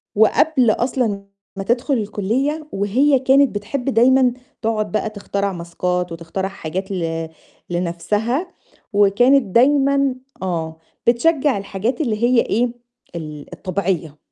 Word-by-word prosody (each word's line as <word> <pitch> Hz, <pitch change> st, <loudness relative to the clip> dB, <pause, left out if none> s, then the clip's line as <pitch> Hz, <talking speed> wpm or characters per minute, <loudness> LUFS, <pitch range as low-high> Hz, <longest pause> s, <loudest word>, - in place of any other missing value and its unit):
وقبل 240 Hz, +3 st, +4 dB
أصلًا 235 Hz, -4 st, -1 dB, 0.3 s
ما 195 Hz, -, -4 dB
تدخُل 240 Hz, +7 st, 0 dB
الكُلّية، 235 Hz, +9 st, -1 dB
وهي 255 Hz, +8 st, +2 dB
كانت 265 Hz, -1 st, +3 dB
بتحب 235 Hz, +6 st, -3 dB
دايمًا 255 Hz, +1 st, +4 dB, 0.3 s
تقعُد 215 Hz, -2 st, -1 dB
بقى 215 Hz, -, -1 dB
تخترع 200 Hz, -1 st, -3 dB
ماسكات 180 Hz, +1 st, -2 dB
وتخترع 165 Hz, +3 st, -4 dB
حاجات 190 Hz, +1 st, -5 dB
ل 165 Hz, -3 st, -3 dB, 0.4 s
لنفسها، 205 Hz, -, -1 dB, 0.5 s
وكانت 245 Hz, +7 st, +4 dB
دايمًا 275 Hz, +1 st, +4 dB, 0.3 s
آه، 165 Hz, -4 st, -3 dB, 0.3 s
بتشجّع 275 Hz, +2 st, +3 dB
الحاجات 200 Hz, -, -2 dB
اللي 230 Hz, -6 st, -1 dB
هي 240 Hz, 0 st, +4 dB
إيه؟ 240 Hz, +4 st, +1 dB, 0.5 s
ال 150 Hz, -3 st, -7 dB
الطبيعية. 185 Hz, -6 st, -2 dB
215 Hz, 115 wpm, -20 LUFS, 190-260 Hz, 0.5 s, وقبل